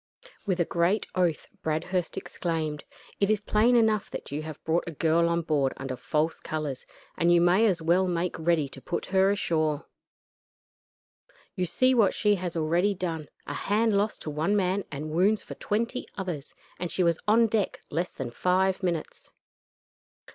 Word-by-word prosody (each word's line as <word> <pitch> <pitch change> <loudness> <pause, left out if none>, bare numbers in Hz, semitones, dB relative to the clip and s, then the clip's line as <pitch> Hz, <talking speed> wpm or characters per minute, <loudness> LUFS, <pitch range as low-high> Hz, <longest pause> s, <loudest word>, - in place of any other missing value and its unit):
With 185 -2 0
a 170 - +3
great 175 +6 +1
oath 175 -4 0
Bradhurst 165 +3 -2
exclaimed: 155 -3 -3 0.3
"It 200 - +2
is 215 -1 +3
plain 215 +4 +3
enough 220 -3 +3
that - - -7
you 145 +2 -2
have 155 -1 -8
brought 165 +2 +1
a - - -3
girl 170 +1 +3
on 170 0 0
board 145 -4 +1
under 135 -1 -4
false 155 +6 -1
colors, 150 -4 -4 0.3
and 170 +1 +3
you 175 - +6
may 180 +6 +4
as 180 -5 0
well 180 +3 +3
make 175 -1 -1
ready 160 -3 +2
to 135 0 -12
put 175 - -3
her 190 0 +5
ashore. 155 -6 0 1.7
You 180 -3 -1
see 255 +9 +3
what 225 -6 +3
she 210 -1 +3
has 180 -3 -3
already 170 +6 +2
done 165 -5 -4 0.2
a 145 - -5
hand 210 +6 +1
lost 205 +2 0
to 155 - -4
one 160 +7 0
man 190 0 +1
and 150 +2 -5
wounds 195 +6 +2
for - - -8
twenty 230 +4 -2
others 175 -7 -5 0.2
and 175 -1 -3
she 185 - +1
was 170 -2 +2
on 225 +2 +5
deck 220 -3 0
less 170 +4 -1
than 125 -3 -6
five 185 +7 +1
minutes. 170 -4 -3
175 Hz, 175 wpm, -27 LUFS, 155-200 Hz, 1.7 s, you